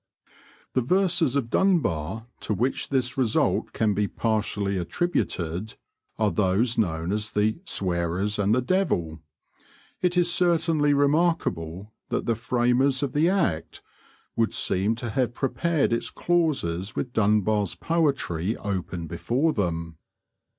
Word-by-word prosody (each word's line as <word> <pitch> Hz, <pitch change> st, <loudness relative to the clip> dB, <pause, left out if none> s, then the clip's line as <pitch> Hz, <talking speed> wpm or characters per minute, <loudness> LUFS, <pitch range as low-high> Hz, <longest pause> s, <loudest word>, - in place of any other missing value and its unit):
The 130 Hz, -, +2 dB
verses 165 Hz, -1 st, +2 dB
of 120 Hz, -5 st, -1 dB
Dunbar 110 Hz, -, +1 dB
to 105 Hz, -, -1 dB
which 125 Hz, +7 st, -1 dB
this 130 Hz, -1 st, 0 dB
result 120 Hz, -4 st, +1 dB
can 110 Hz, -2 st, +1 dB
be 105 Hz, +1 st, 0 dB
partially 105 Hz, -2 st, -1 dB
attributed 90 Hz, -, -2 dB, 0.4 s
are 110 Hz, -2 st, +2 dB
those 105 Hz, +4 st, +1 dB
known 85 Hz, -5 st, -1 dB
as 105 Hz, +1 st, -1 dB
'The 105 Hz, +6 st, 0 dB
Sweirers 90 Hz, +3 st, -1 dB
and 100 Hz, +2 st, +3 dB
the 125 Hz, -, +1 dB
Devill.' 125 Hz, -, 0 dB, 0.8 s
It 180 Hz, 0 st, +1 dB
is 175 Hz, -1 st, +3 dB
certainly 160 Hz, -4 st, +2 dB
remarkable 140 Hz, -, 0 dB, 0.2 s
that -, -, -1 dB
the 115 Hz, -, +2 dB
framers 125 Hz, +4 st, +1 dB
of 135 Hz, -, -2 dB
the 155 Hz, +4 st, +3 dB
Act 170 Hz, -, -1 dB, 0.5 s
would 115 Hz, -1 st, +1 dB
seem 100 Hz, +5 st, +1 dB
to 120 Hz, 0 st, -5 dB
have 125 Hz, -2 st, 0 dB
prepared 145 Hz, 0 st, 0 dB
its 115 Hz, -, -1 dB
clauses 125 Hz, -, 0 dB
with 125 Hz, -, -3 dB
Dunbar's 105 Hz, -2 st, +2 dB
poetry 135 Hz, -, 0 dB
open 90 Hz, -4 st, -4 dB
before 120 Hz, -, 0 dB
them. 85 Hz, -5 st, -2 dB
115 Hz, 130 wpm, -25 LUFS, 95-145 Hz, 0.8 s, and